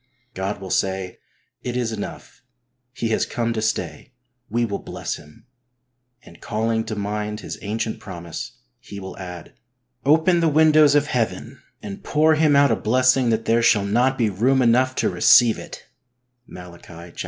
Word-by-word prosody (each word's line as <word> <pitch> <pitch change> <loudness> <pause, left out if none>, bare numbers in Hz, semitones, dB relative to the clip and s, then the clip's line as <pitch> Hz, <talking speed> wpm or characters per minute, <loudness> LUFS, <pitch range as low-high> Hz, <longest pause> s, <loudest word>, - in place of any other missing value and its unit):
God 95 +1 -4
will 95 -1 -8
say: 95 -1 -2 0.2
" - - -44 0.2
It 125 0 -3
is 120 -2 -1
enough; 105 -2 -8 0.5
he 120 -3 -3
has 110 - +1
come 115 -1 -2
to 110 - -3
stay; 105 -1 -3 0.4
we 120 +2 0
will 100 -3 -4
bless - - -5
him," 75 +8 -18 0.8
and, - - -17
calling 110 0 -1
to 110 -1 -5
mind 105 +1 -4
His - - -7
ancient 110 +2 -3
promise. 85 -4 -8 0.2
He 100 - -10
will 95 -1 -8
add: 90 -3 -9 0.3
" 125 +1 -51
Open 160 +5 +3
the 165 -1 +2
windows 155 -1 +5
of 145 0 +3
Heaven 120 -6 -3 0.2
and 100 -1 -8
pour 155 +2 +3
him 155 -2 +3
out 140 0 +5
a - - +3
blessing 130 +2 +2
that 115 0 0
there 115 +1 +2
shall 110 -3 +3
not 125 +6 +1
be 110 -4 +1
room 125 +8 +2
enough 130 +2 +3
to - - 0
receive 120 -3 +5
it" - - -10 0.6
(Malachi 90 -1 -12
iii. 85 +1 -12
115 Hz, 175 wpm, -22 LUFS, 100-130 Hz, 0.8 s, windows